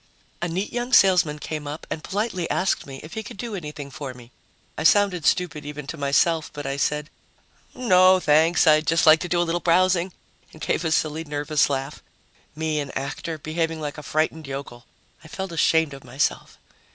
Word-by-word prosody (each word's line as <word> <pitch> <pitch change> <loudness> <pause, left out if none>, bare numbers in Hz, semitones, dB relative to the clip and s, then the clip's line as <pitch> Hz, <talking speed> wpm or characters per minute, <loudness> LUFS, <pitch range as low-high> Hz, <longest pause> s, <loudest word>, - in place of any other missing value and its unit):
A 175 - 0
neat 185 +4 -3
young 245 +1 -3
salesman 180 -8 +5
came 150 0 -5
up 150 +2 -6
and 155 - -4
politely 195 -4 -2
asked 185 -4 0
me 135 -1 -8
if 155 - -10
he 220 - -3
could 205 - -10
do 235 0 -5
anything 150 -6 -7
for 135 -3 -7
me. 120 -1 -15 0.4
I - - -4
sounded 180 -4 +3
stupid 160 -4 0
even 150 0 -7
to 140 - -6
myself, 155 +3 +1
but 145 -1 -7
I 135 0 -2
said, 150 +2 -1 0.6
"No, 185 -6 +5
thanks, 160 +2 +4
I'd 155 -1 +4
just 165 +2 +3
like 155 0 +7
to 175 - -5
do 175 - +1
a - - +3
little 170 +1 -1
browsing," 180 +1 +2 0.4
and 155 - -14
gave 165 - -1
a 160 - -1
silly 155 0 0
nervous 150 -1 0
laugh. 135 +1 -3 0.5
Me, 155 -1 -1
an 140 -2 -4
actor, 145 +4 -4
behaving 160 +1 -2
like 150 0 -5
a - - -7
frightened 155 0 -1
yokel! 135 -3 -7 0.4
I - - -12
felt 190 +3 -6
ashamed 160 -2 +2
of 135 - -11
myself. 125 +3 -2
160 Hz, 195 wpm, -24 LUFS, 145-175 Hz, 0.6 s, like